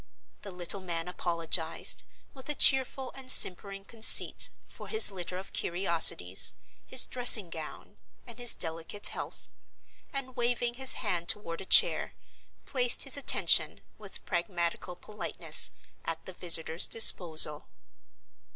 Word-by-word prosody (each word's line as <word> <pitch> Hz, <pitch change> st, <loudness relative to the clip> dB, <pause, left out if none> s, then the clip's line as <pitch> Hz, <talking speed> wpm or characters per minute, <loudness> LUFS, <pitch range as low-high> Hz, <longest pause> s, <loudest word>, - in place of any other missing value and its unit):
The 200 Hz, -, -11 dB
little 180 Hz, +1 st, -4 dB
man 170 Hz, -2 st, -8 dB
apologized, 170 Hz, -2 st, -4 dB, 0.3 s
with 265 Hz, +1 st, -16 dB
a 300 Hz, -, -4 dB
cheerful 265 Hz, -1 st, +1 dB
and 265 Hz, -1 st, -13 dB
simpering 195 Hz, +2 st, +3 dB
conceit, 225 Hz, 0 st, +4 dB, 0.2 s
for -, -, -15 dB
his 440 Hz, -, +3 dB
litter 180 Hz, -1 st, -9 dB
of 190 Hz, -, -13 dB
curiosities, 170 Hz, -, 0 dB, 0.3 s
his 260 Hz, -, +1 dB
dressing 235 Hz, -7 st, +2 dB
gown, 155 Hz, -2 st, -12 dB, 0.3 s
and 235 Hz, -1 st, -16 dB
his 245 Hz, -1 st, -1 dB
delicate 165 Hz, +4 st, -4 dB
health; -, -, -8 dB, 0.6 s
and, 270 Hz, -3 st, -9 dB
waving 240 Hz, -1 st, -4 dB
his 265 Hz, +1 st, +1 dB
hand 175 Hz, -4 st, -6 dB
toward 170 Hz, -5 st, -3 dB
a -, -, -12 dB
chair, -, -, +3 dB, 0.5 s
placed 245 Hz, -3 st, -1 dB
his 275 Hz, -, -2 dB
attention, 280 Hz, -, 0 dB, 0.2 s
with 205 Hz, -2 st, -13 dB
pragmatical 175 Hz, 0 st, -6 dB
politeness, 210 Hz, +4 st, -1 dB, 0.3 s
at 165 Hz, -1 st, -9 dB
the 185 Hz, -, -12 dB
visitor's 165 Hz, -2 st, +1 dB
disposal. 160 Hz, -8 st, +5 dB
190 Hz, 125 wpm, -26 LUFS, 170-245 Hz, 0.6 s, disposal